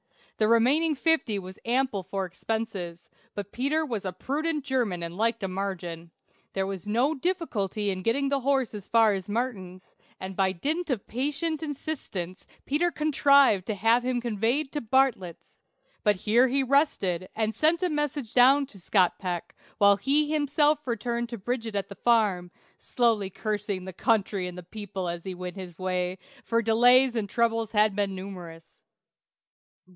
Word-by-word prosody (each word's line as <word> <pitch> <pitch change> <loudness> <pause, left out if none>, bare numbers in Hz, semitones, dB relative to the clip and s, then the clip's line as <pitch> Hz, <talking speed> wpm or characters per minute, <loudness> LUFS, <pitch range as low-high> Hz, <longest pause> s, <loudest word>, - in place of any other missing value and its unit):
The 215 - +2
remaining 275 +8 +3
fifty 300 -8 +1
was 190 0 -8
ample 245 -4 0
for 190 +1 -3
expenses; 185 -3 -5 0.3
but 205 -1 -5
Peter 295 +6 0
was 230 -8 -4
a 185 - -3
prudent 300 - -2
German 235 -11 -1
and 170 +1 -6
liked 225 +1 0
a - - 0
margin. 180 -3 -5 0.4
There 190 0 -1
was 195 -1 -6
no 245 +8 +2
difficulty 240 - -1
in 185 -1 -3
getting 275 +8 +1
the 280 0 +1
horse 265 -2 0
as 205 -2 -8
far 225 -2 +4
as 190 0 -5
Martin's, 205 -6 -4 0.2
and 190 0 -6
by 190 -1 +2
dint 315 - -2
of 245 -7 -2
patient 295 +6 -2
insistence 270 - -5 0.2
Peter 315 +5 +1
contrived 280 - +3
to 215 - -1
have 225 +4 +3
him 250 -1 0
conveyed 240 +5 0
to 295 - -3
Bartlett's; 230 -8 0 0.4
but 210 -1 +4
here 225 +7 +3
he 270 +2 +1
rested 205 - +1
and 220 0 0
sent 325 +7 +2
a 365 - +2
messenger 295 -5 -2
down 270 +3 +6
to 220 -7 -13
Scott 185 0 +2
Peck, 180 -3 -4 0.2
while 200 -1 +5
he 290 +8 +2
himself 295 0 +2
returned 235 0 -2
to 235 - -5
Bridget 225 +1 -3
at 200 - -2
the - - -7
farm, 205 -6 +1 0.3
slowly 225 -5 +1
cursing 205 -2 -3
the 190 - -7
country 200 -2 0
and 180 0 -7
the 180 - -8
people 190 -1 -6
as 170 0 -4
he 190 -1 -5
went 180 +1 -7
his 180 -3 -8
way, 185 0 -2 0.3
for 230 - -1
his - - -11
delays 245 +3 +5
and 210 -3 -2
troubles 230 -1 0
had 210 -1 +3
been 200 -2 -1
numerous. 175 -4 -10
225 Hz, 170 wpm, -27 LUFS, 190-265 Hz, 0.4 s, down